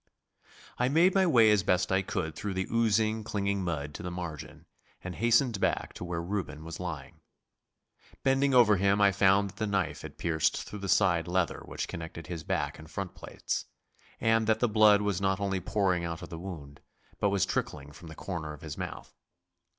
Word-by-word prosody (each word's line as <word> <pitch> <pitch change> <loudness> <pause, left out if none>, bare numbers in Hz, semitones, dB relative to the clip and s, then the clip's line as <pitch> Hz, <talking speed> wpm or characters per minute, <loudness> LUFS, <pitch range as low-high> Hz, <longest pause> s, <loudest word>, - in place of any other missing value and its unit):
I 125 +1 +2
made 170 +6 +4
my 190 -1 +4
way 115 -8 +6
as 105 -2 +4
best 90 0 +1
I 95 +1 +3
could 80 -4 -3
through 100 -2 -4
the 95 0 -1
oozy 110 -1 +2
clinging 100 -2 -1
mud 75 -4 -3
to - - -7
the 90 - -4
margin, 85 -4 -7 0.4
and 90 - -5
hastened 120 - +2
back - - 0
to - - -8
where 85 -1 -3
Reuben 85 -5 -4
was 85 0 -7
lying. 80 -3 -6 1.0
Bending 135 +1 +3
over 115 -5 +6
him 100 +2 +2
I 100 -1 +5
found 100 +1 +3
that - - -25
the 110 - -1
knife 95 -6 -1
had - - -10
pierced 80 -2 0
through 105 - -8
the 100 -1 -5
side 85 -5 +3
leather 90 -1 0
which - - -4
connected 80 -1 -7
his 85 -1 -6
back - - -2
and 80 0 -12
front 95 +1 -5
plates, - - -4 0.5
and 115 0 +2
that 110 0 +3
the 120 - +3
blood 105 -1 +5
was 100 -2 -1
not 95 0 +1
only 95 -1 -1
pouring 90 -1 0
out 85 -1 -4
of - - -8
the 85 -2 -7
wound, 75 -6 -8 0.4
but 100 - +2
was 100 -2 +2
trickling 75 -1 -3
from 80 +3 -13
the 80 - -9
corner 80 -5 -5
of 75 - -12
his 80 -2 -7
mouth. - - -6
95 Hz, 200 wpm, -29 LUFS, 85-105 Hz, 1.0 s, way